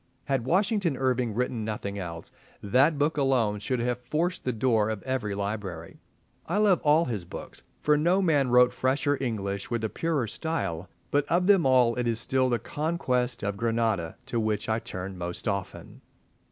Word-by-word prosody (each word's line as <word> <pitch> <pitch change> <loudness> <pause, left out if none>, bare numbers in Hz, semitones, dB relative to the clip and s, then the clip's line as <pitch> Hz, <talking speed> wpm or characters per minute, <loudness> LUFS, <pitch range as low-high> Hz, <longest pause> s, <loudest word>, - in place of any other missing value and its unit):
Had 135 -4 0
Washington 190 - +1
Irving 125 -4 0
written 120 -2 -1
nothing 100 -2 -4
else, 85 -3 -6 0.3
that 135 +9 +3
book 145 +2 +1
alone 125 -7 +2
should 125 +4 -2
have 125 0 -1
forced 160 +9 -2
the 125 - +1
door 115 -2 +1
of 110 -3 -4
every 125 -6 -2
library. 100 -5 -5 0.5
I 175 - 0
love 205 -4 +4
all 155 +2 +4
his 110 -8 -3
books, 85 - -9 0.2
for 150 - +3
no 170 +6 +3
man 150 -8 +2
wrote 125 0 +5
fresher 140 +2 +1
English 100 -5 -3
with 115 -2 -2
a 110 - 0
purer 160 -3 -1
style; 100 - -3 0.2
but 145 0 +2
of 175 +2 +2
them 190 -7 +5
all 125 -3 +4
it 125 -1 0
is 115 -1 0
still 130 +2 +1
"The 120 - +2
Conquest 125 -3 -1
of 100 0 -2
Granada" 115 -7 0
to 120 - -2
which 110 -1 -1
I 110 0 +1
turn 95 -2 -6
most 90 +5 -4
often. 100 -2 -4
125 Hz, 180 wpm, -27 LUFS, 105-145 Hz, 0.5 s, wrote